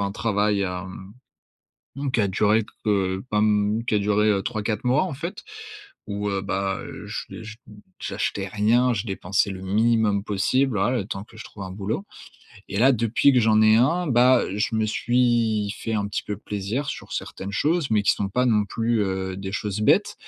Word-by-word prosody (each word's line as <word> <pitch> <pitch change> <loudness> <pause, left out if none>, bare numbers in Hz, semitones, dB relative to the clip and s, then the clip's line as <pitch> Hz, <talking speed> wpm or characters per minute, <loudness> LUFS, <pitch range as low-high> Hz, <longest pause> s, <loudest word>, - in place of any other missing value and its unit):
un 100 -1 -1
travail, 105 -1 0
hem, 95 +1 -6 0.8
mmh 140 -1 -3
qui 115 - +2
a 100 - +2
duré 105 +3 +2 0.2
heu, 95 -3 0
pas 105 - +2
m 105 +1 +2
qui 105 - +2
a - - +3
duré, 105 +1 +2
heu, 100 -2 +1
3-4 110 0 -2
mois, 130 +5 +3
en 180 -6 -4
fait, 170 +7 -6 0.6
où, 105 0 -3
heu, 100 -1 -1
bah, 95 0 -2 0.3
j'ai - - -7
j 110 0 -9 0.4
j'achetais 100 -1 -3
rien. 115 +5 +2
Je 105 -1 -3
dépensais 95 -1 0
le 95 -1 -7
minimum 105 +1 +2
possible, 110 +5 +1
voilà, 120 +6 +1
le 100 - -4
temps 95 0 -5
que 115 - -19
je - - -8
trouve 100 - -9
un 95 - -7
boulot 105 - -3 0.6
et 100 - -3
là, 130 +4 +6
depuis 115 +4 +3
que 125 - +4
j'en 110 -1 +4
ai 110 0 +6
un, 165 +10 +2
bah, 125 0 +5
je 105 +2 -1
me 110 0 +1
suis 115 -3 +1
fait 115 - -2
un 100 -1 0
petit 100 - -3
peu 105 - -4
plaisir 105 +9 -4
sur - - -6
certaines 95 - -5
choses. 155 - 0
Mais 105 -2 +3
qui - - +4
sont 100 - -2
pas, 125 +6 +1
non 105 -3 +3
plus, 115 +1 0
heu, 95 -1 -3
des 95 0 -5
choses 105 0 -3
bêtes. 105 - +3
105 Hz, 200 wpm, -24 LUFS, 100-115 Hz, 0.8 s, là